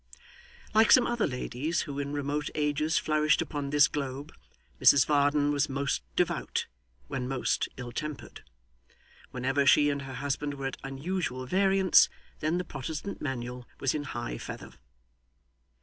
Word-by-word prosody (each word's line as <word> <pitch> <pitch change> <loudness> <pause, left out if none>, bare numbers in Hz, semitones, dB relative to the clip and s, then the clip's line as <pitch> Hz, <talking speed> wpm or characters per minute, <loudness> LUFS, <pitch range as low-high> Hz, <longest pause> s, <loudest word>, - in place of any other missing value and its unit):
Like 220 0 +5
some 250 - +7
other 240 -2 0
ladies 145 +5 -2
who 140 -1 -5
in 140 0 -3
remote 145 0 -2
ages 150 +1 +1
flourished 155 +1 +2
upon 145 -2 -3
this 145 0 +5
globe, 140 0 -5 0.5
Mrs 135 -3 +7
Varden 145 0 +2
was 145 0 +1
most 140 - -1
devout - - 0 0.4
when 130 -2 -3
most 130 -1 0
ill 120 -1 -6
tempered. 150 +3 -6 0.9
Whenever 135 +3 0
she 145 +2 +5
and 140 0 -3
her 135 -1 -7
husband 145 +1 -2
were 135 -1 -6
at 135 - -3
unusual 135 -1 -3
variance, 190 +4 +4 0.3
then 155 +3 0
the 180 - -1
Protestant 155 +7 -6
Manual 125 -2 -4
was 135 - +1
in 150 -1 -3
high 120 - -5
feather. - - -8
145 Hz, 145 wpm, -29 LUFS, 135-155 Hz, 0.9 s, some